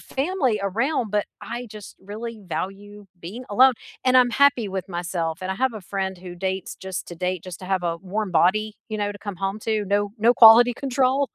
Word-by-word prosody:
family 270 Hz, -, -1 dB
around, 225 Hz, +4 st, -1 dB
but 210 Hz, 0 st, 0 dB, 0.2 s
I 240 Hz, +1 st, -6 dB
just 210 Hz, -2 st, -10 dB
really 220 Hz, +3 st, -7 dB
value 200 Hz, +3 st, -6 dB
being 205 Hz, +10 st, -8 dB
alone 255 Hz, +5 st, +6 dB, 0.3 s
and 255 Hz, 0 st, +4 dB
I'm 250 Hz, -1 st, +5 dB
happy 275 Hz, -3 st, +3 dB
with 190 Hz, -1 st, -5 dB
myself 170 Hz, -2 st, -3 dB
and 185 Hz, -, -3 dB
I -, -, -1 dB
have 260 Hz, +1 st, 0 dB
a 215 Hz, -, -6 dB
friend 190 Hz, 0 st, -3 dB
who 180 Hz, 0 st, -9 dB
dates 190 Hz, +1 st, -3 dB
just 190 Hz, -2 st, -6 dB
to 175 Hz, -, -7 dB
date 180 Hz, 0 st, -3 dB
just 185 Hz, -2 st, -8 dB
to 185 Hz, -, -8 dB
have 190 Hz, -1 st, 0 dB
a 170 Hz, -1 st, -1 dB
warm 195 Hz, +3 st, -3 dB
body, 200 Hz, +6 st, +2 dB
you 215 Hz, -, -3 dB
know, 205 Hz, 0 st, -1 dB
to 205 Hz, -, -12 dB
come 205 Hz, -3 st, -6 dB
home 195 Hz, +3 st, -3 dB
to, 215 Hz, -1 st, -1 dB
no 205 Hz, +1 st, +1 dB
no 230 Hz, +3 st, +4 dB
quality 235 Hz, +1 st, +8 dB
control, 265 Hz, 0 st, 0 dB
205 Hz, 210 wpm, -23 LUFS, 190-235 Hz, 0.3 s, quality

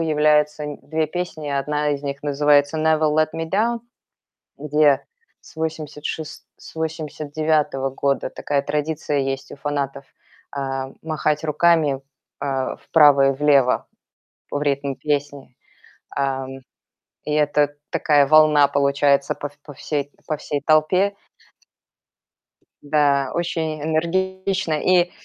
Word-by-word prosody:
является 150 Hz, -1 st, +2 dB
нь 145 Hz, -, -6 dB
2 155 Hz, +1 st, -1 dB
песни. 160 Hz, -3 st, -5 dB
Одна 150 Hz, +1 st, -1 dB
из 145 Hz, 0 st, -2 dB
них 140 Hz, 0 st, -5 dB
называется 145 Hz, +1 st, +2 dB
"Never 155 Hz, -1 st, +2 dB
Let 155 Hz, 0 st, +2 dB
Me 165 Hz, 0 st, -4 dB
Down", 230 Hz, +4 st, +1 dB, 0.8 s
где 150 Hz, -1 st, +2 dB, 0.4 s
с -, -, -17 dB
восемьдесят 155 Hz, -2 st, -5 dB
шес 155 Hz, -1 st, -6 dB
с -, -, -14 dB
89 155 Hz, -3 st, -1 dB
года 140 Hz, +1 st, -1 dB
такая 140 Hz, -1 st, -1 dB
традиция 150 Hz, 0 st, -2 dB
есть 135 Hz, 0 st, -3 dB
у -, -, -9 dB
фанатов: 140 Hz, -1 st, -3 dB, 0.4 s
а, 135 Hz, -1 st, -4 dB
махать 155 Hz, -1 st, -1 dB
руками, 155 Hz, -3 st, +2 dB, 0.4 s
э, 135 Hz, -2 st, -2 dB
вправо 145 Hz, -3 st, +5 dB
и -, -, 0 dB
влево 140 Hz, -2 st, +3 dB, 0.7 s
в 145 Hz, -, -1 dB
ритм 140 Hz, -1 st, -1 dB
песни. 145 Hz, -3 st, -3 dB, 0.6 s
Ам, 135 Hz, -1 st, -2 dB, 0.6 s
и 150 Hz, -, -3 dB
это 145 Hz, -1 st, +2 dB, 0.2 s
такая 145 Hz, -3 st, +3 dB
волна 150 Hz, -1 st, +6 dB
получается 140 Hz, 0 st, +2 dB
по 145 Hz, -, -5 dB
в 145 Hz, +1 st, -26 dB
по 145 Hz, -, -11 dB
всей 145 Hz, 0 st, -3 dB, 0.2 s
по 155 Hz, -, -1 dB
всей 145 Hz, 0 st, -3 dB
толпе. 180 Hz, +6 st, +3 dB, 1.7 s
Да, 145 Hz, -2 st, +2 dB
очень 160 Hz, -3 st, -2 dB
энергично. 190 Hz, +2 st, -1 dB
И, 180 Hz, -1 st, +3 dB
150 Hz, 120 wpm, -22 LUFS, 140-155 Hz, 1.7 s, волна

